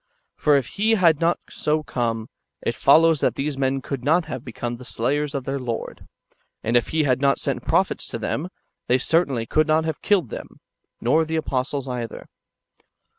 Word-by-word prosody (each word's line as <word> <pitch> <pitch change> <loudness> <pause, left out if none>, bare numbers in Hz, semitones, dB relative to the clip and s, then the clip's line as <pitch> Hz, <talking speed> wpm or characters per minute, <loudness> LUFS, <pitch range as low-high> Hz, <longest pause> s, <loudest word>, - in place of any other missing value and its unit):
For 150 -1 +3
if 135 -3 +2 0.2
He 225 +1 +4
had 170 -6 +4
not 170 +1 +3
so 155 0 -1
come, 115 -5 -2 0.4
it - - 0
follows 165 -1 +5
that - - +1
these 145 +1 -2
men 135 0 0
could 135 -3 -4
not 165 +5 +3
have - - -6
become 120 0 -5
the 125 - -11
slayers 140 +5 -1
of 135 - -2
their 135 +2 -3
Lord; 120 -3 -5 0.6
and 115 +2 0
if 120 - +3
He 160 -1 +1
had 130 -2 +1
not 140 -1 +3
sent - - -3
prophets - - +1
to - - -5
them, 170 +5 -3 0.4
they 125 - +4
certainly 135 -4 +1
could 155 +7 +2
not 160 +1 +2
have 160 -2 -3
killed 185 - +2
them, - - -8 0.4
nor 150 +7 +3
the 160 0 -3
apostles 135 -2 -2
either. 120 -2 -5
140 Hz, 185 wpm, -23 LUFS, 125-160 Hz, 0.6 s, follows